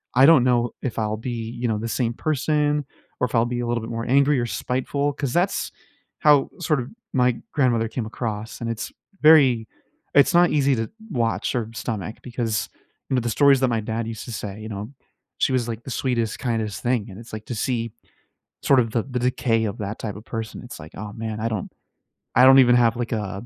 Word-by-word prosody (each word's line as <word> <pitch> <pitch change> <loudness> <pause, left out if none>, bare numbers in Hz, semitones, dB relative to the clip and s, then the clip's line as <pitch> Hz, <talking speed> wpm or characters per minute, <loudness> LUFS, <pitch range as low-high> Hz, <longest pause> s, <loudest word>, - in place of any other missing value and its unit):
I 130 +2 +7
don't 155 -5 +7
know 120 -2 +2
if 130 - -4
I'll 110 -1 -1
be, 115 -1 -4
you 120 - 0
know, 110 -2 0
the 115 +2 -4
same 120 0 0
person 150 +1 0 0.3
or - - +2
if 120 - -4
I'll 115 - +4
be 120 0 -3
a 120 - -2
little 120 -1 0
bit 115 - -7
more 115 0 -3
angry 140 +2 +4
or 120 - 0
spiteful 135 +4 -1
'cause 140 -3 -3
that's 180 +3 0 0.5
how, 145 -3 +5
sort 155 -4 +1
of, 125 +1 -5 0.2
my 125 -2 +2 0.2
grandmother 120 -6 +2
came 115 0 -4
across, 110 +1 -5
and 115 - -2
it's 115 -1 -4 0.3
very 135 -8 +6 0.5
it's 145 +5 +5
not 175 +1 +5
easy 140 -2 +3
to 115 -1 -2 0.2
watch 115 -1 0
or 115 -2 -1
stomach 110 -2 -4
because, 115 -3 -2 0.4
me 130 - +2
the 120 0 -2
stories 140 +4 +5
that 130 - +4
my 115 -2 +1
dad 110 +1 -3
used 115 -2 -6
to 120 - -7
say, 105 -1 -5
you 110 - -7
know, 105 +1 -5 0.5
she - - +2
was, 125 -2 +1
like, 115 0 -5
"the 130 - -7
sweetest, 115 -3 -1
kindest 110 -4 -2
thing," 120 -4 0
and 95 +1 -10
it's 115 0 -13
like, 110 0 -6
to - - -5
see, 115 0 -1 0.7
sort 135 -2 +5
of, 115 - -1
the 115 - +1
the 125 -2 -3
decay 120 -2 +1
of 100 - -4
that 105 +1 -4
type 105 -3 -4
of 105 - -11
person. 115 0 -6
It's, 125 - -9
like, 75 - -10
"Oh, 105 0 -6
man." 110 -1 -4
I 110 - -1
don't 110 -4 -4 0.6
I 125 - +6
don't 135 +1 +9
even 120 -2 +6
have, 120 -1 +4
like, 120 -1 -3
a 105 -1 -4
120 Hz, 225 wpm, -23 LUFS, 110-130 Hz, 0.7 s, don't